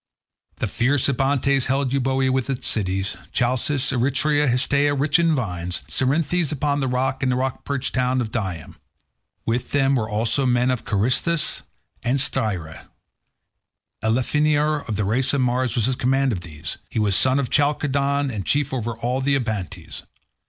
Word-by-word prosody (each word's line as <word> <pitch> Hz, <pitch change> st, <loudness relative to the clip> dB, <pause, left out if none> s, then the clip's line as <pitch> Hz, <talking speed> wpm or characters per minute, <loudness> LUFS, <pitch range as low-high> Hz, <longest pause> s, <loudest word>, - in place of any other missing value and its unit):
The -, -, -2 dB
fierce 130 Hz, +2 st, +1 dB
Abantes 140 Hz, 0 st, +1 dB
held 135 Hz, 0 st, 0 dB
Euboea 130 Hz, 0 st, +1 dB
with 130 Hz, 0 st, -1 dB
its 135 Hz, -2 st, -1 dB
cities, 95 Hz, -1 st, 0 dB
Chalcis, 130 Hz, +2 st, +1 dB
Eretria, 140 Hz, +4 st, +1 dB
Histiaea 140 Hz, +3 st, +2 dB
rich 145 Hz, +4 st, +3 dB
in 165 Hz, -2 st, +3 dB
vines, 90 Hz, -8 st, -2 dB
Cerinthus 150 Hz, +4 st, 0 dB
upon 145 Hz, -1 st, 0 dB
the 135 Hz, -, 0 dB
sea, 130 Hz, +1 st, 0 dB
and 130 Hz, -1 st, +1 dB
the -, -, +1 dB
rock 130 Hz, 0 st, -2 dB
perched 140 Hz, -2 st, -2 dB
town 125 Hz, 0 st, +1 dB
of 115 Hz, -3 st, -3 dB
Dium; 95 Hz, -8 st, -4 dB, 0.7 s
with 120 Hz, +2 st, -2 dB
them 135 Hz, -1 st, +3 dB
were 110 Hz, -3 st, -1 dB
also 115 Hz, +5 st, 0 dB
the 130 Hz, -, +1 dB
men 125 Hz, +1 st, +2 dB
of 125 Hz, -, -3 dB
Carystus 130 Hz, -, +1 dB, 0.4 s
and 125 Hz, +3 st, +1 dB
Styra; 100 Hz, -, -2 dB, 1.2 s
Elephenor 150 Hz, +6 st, +1 dB
of 110 Hz, -, -1 dB
the 105 Hz, 0 st, -1 dB
race 125 Hz, +7 st, +1 dB
of 140 Hz, -, +1 dB
Mars 125 Hz, 0 st, 0 dB
was 115 Hz, -2 st, +2 dB
in 130 Hz, -, +1 dB
command 135 Hz, +2 st, +1 dB
of 95 Hz, -6 st, -3 dB
these; 80 Hz, -2 st, -6 dB
he -, -, -6 dB
was 105 Hz, -3 st, +3 dB
son 130 Hz, +5 st, +4 dB
of 140 Hz, -3 st, -2 dB
Chalcodon, 140 Hz, -1 st, +1 dB
and 100 Hz, -3 st, -3 dB
chief 140 Hz, +6 st, 0 dB
over 115 Hz, -3 st, -3 dB
all 125 Hz, +3 st, -1 dB
the 140 Hz, +1 st, +2 dB
Abantes. 110 Hz, -8 st, -4 dB
130 Hz, 165 wpm, -22 LUFS, 115-140 Hz, 1.2 s, son